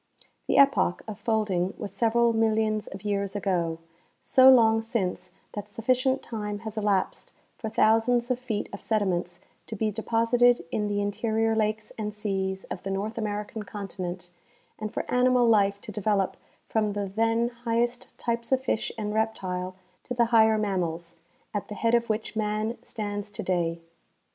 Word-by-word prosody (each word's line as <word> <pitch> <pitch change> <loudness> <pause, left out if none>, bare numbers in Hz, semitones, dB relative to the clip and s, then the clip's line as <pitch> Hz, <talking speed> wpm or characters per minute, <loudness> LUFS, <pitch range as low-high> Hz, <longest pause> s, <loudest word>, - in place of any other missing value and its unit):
The - - +2
epoch 275 -10 +4
of 215 -1 -6
folding 205 -4 0
Avas - - -6
several 230 +3 +3
millions 220 -1 +1
of 190 +1 -9
years 200 -1 -1
ago; 175 -5 0 0.5
so 260 -1 +7
long 225 -3 +6
since 190 -5 -2 0.2
that 205 0 -6
sufficient 255 +4 +1
time 210 -2 -4
has 220 0 -5
elapsed 205 -3 0 0.2
for 220 - -5
thousands 235 +3 +3
of 250 - 0
feet 225 -5 -3
of 200 - -7
sediments 180 -5 -1 0.3
to 220 - -5
be 215 +1 0
deposited 230 0 +2
in 210 -1 0
the 205 0 0
interior 220 +2 0
lakes 215 0 -1
and 210 -1 -3
seas 190 -2 -2
of - - -6
the 195 - -5
North 205 +4 -2
American 210 0 -3
continent 185 -3 -6 0.5
and 215 -1 -4
for - - -3
animal 250 -1 +3
life 200 -3 +3
to - - -7
develop 205 -1 0 0.3
from 215 -2 0
the 205 0 -2
then 225 +4 +1
highest 240 +1 -1
types 235 0 -2
of 265 - +4
fish 230 -3 -1
and 210 -1 -3
reptile 185 -4 -2 0.3
to 250 - -5
the 240 -1 +4
higher 220 -1 +6
mammals, 170 -5 -2 0.4
at 205 - -3
the 210 - -7
head 230 +2 +1
of 235 -1 +2
which 220 +1 -2
man 215 +1 -1
stands 205 -1 -5
today. 175 -4 -1
215 Hz, 160 wpm, -27 LUFS, 200-230 Hz, 0.5 s, so